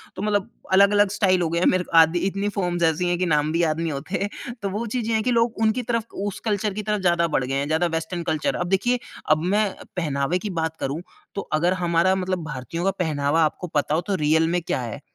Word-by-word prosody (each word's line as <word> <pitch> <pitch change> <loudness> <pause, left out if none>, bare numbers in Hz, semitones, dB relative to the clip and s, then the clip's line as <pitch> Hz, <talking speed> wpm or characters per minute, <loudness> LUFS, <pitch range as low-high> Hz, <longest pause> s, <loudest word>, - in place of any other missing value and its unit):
तो - - -6
मतलब 205 0 0 0.2
अलग-अलग 200 +1 +5
स्टाइल 190 -3 +2
हो 165 - 0
गया 170 +1 0
है, - - +4
मेरे 185 -1 +1
को - - -17
आधी 165 +2 +6
इतनी 195 +1 -1
फॉर्म्स 175 -4 -1
ऐसी 165 +2 +2
हैं 175 - +1
कि 185 - +1
नाम 150 -2 +1
भी 170 +2 +1
याद 155 -1 0
नहीं 165 -1 -1
होते 180 +8 -3 0.3
तो 200 - -2
वो 210 +4 -3
चीज़ें 230 -3 -1
हैं 220 - +2
कि 250 - +1
लोग 230 0 +1
उनकी 220 +3 +2
तरफ, 230 -2 +1
उस 200 0 -4
कल्चर 210 -1 0
की 215 +2 -4
तरफ 210 -1 -1
ज़्यादा 170 -2 +2
बढ़ 135 - +2
गए 130 +2 -3
हैं, 140 +1 0
ज़्यादा 160 +3 +1
वेस्टर्न 170 +2 -4
कल्चर 155 -1 0
अब 175 - -2
देखिए, 245 +6 +2 0.3
अब 155 +1 +3
मैं 205 +4 +2 0.3
पहनावे 150 +1 0
की - - -1
बात 160 0 -2
करूँ, 140 +5 -3 0.3
तो 200 - -1 0.2
अगर 175 +3 +2
हमारा 170 +2 +3
मतलब, 185 -2 -2
भारतीयों 150 +4 -5
का 195 - +3
पहनावा 150 0 +1
आपको 180 +3 -3
पता 150 -1 0
हो, 165 - +1
तो 195 +3 -2
रियल 160 +2 +3
में 175 +1 0
क्या 160 - -2
है? 115 -3 -6
175 Hz, 245 wpm, -23 LUFS, 160-200 Hz, 0.3 s, आधी